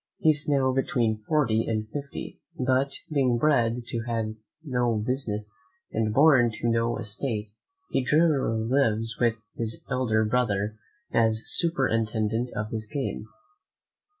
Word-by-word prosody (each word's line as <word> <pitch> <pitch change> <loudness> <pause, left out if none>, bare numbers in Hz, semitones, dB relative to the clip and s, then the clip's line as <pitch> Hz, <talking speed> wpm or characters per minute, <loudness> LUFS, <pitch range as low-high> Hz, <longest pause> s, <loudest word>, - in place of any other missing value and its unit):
He 155 - +4
is 150 0 +1
now 135 -2 +2
between 115 -4 0
forty 125 -8 +1
and 110 -1 -2
fifty; 140 -1 -7 0.2
but 130 +2 +1 0.2
being 130 -4 +2
bred 120 -4 +1
to 115 -2 -2 0.3
no 125 -5 0
business 105 -3 -1 0.4
and 110 -1 0
born 135 -1 +5
to 115 - -1
no 115 0 +1
estate, 110 0 -3 0.4
he 135 - +1
generally 140 -6 +2
lives 115 -4 +1
with 120 -2 +2 0.2
his 115 -1 -2
elder 110 -4 +1
brother 105 -3 0 0.4
as 110 -1 +3
superintendent 115 -7 +2
of 105 0 -3
his 110 -1 -3
game. 135 -6 -3
115 Hz, 125 wpm, -26 LUFS, 110-135 Hz, 0.4 s, born